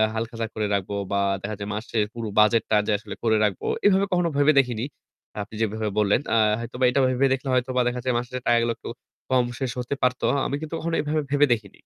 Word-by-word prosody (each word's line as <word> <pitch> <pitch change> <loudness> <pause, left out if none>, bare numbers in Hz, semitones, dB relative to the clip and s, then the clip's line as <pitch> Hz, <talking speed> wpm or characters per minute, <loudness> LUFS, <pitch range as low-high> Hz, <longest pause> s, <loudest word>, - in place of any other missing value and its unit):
হালখাতা 115 0 -3
করে 110 -1 -1
রাখব 100 -2 -1 0.2
বা 100 - +1 0.2
দেখা 105 +2 -4
যায় 100 - -5
মাসের 110 0 -1
পুরো 115 -2 -5
বাজেটটা 110 +1 +4
যে - - +2
আসলে - - -8
করে 110 -2 +3
রাখব। 105 -3 0 0.2
এভাবে 200 -1 +5
কখনো 175 -2 +2
ভেবে 145 +2 +5
দেখিনি। 120 -3 0 0.6
আপনি 105 +2 -8
যেভাবে 110 0 -1
বললেন, 105 +5 +3
আ - - +4 0.2
হয়তোবা 125 +2 -5
এটা 135 +2 +1
ভেবে 130 +1 +2
দেখলে 135 +1 -4
হয়তোবা 125 0 +1
দেখা 125 0 -1
যায় 130 - 0
মাস 120 - -2
শেষে 125 0 -5
টাকাগুলো 115 0 +3
একটু - - -8 0.4
কম 130 -2 +3
শেষ 130 -3 -2
হতে 125 +3 -3
পারত। 125 0 +1
আ - - +1
আমি 140 - -2
কিন্তু 155 +1 -7
কখনো 165 0 -2
এভাবে 155 +1 -1
ভেবে 145 0 +5
দেখিনি। 105 -4 -7
120 Hz, 220 wpm, -24 LUFS, 110-135 Hz, 0.6 s, এভাবে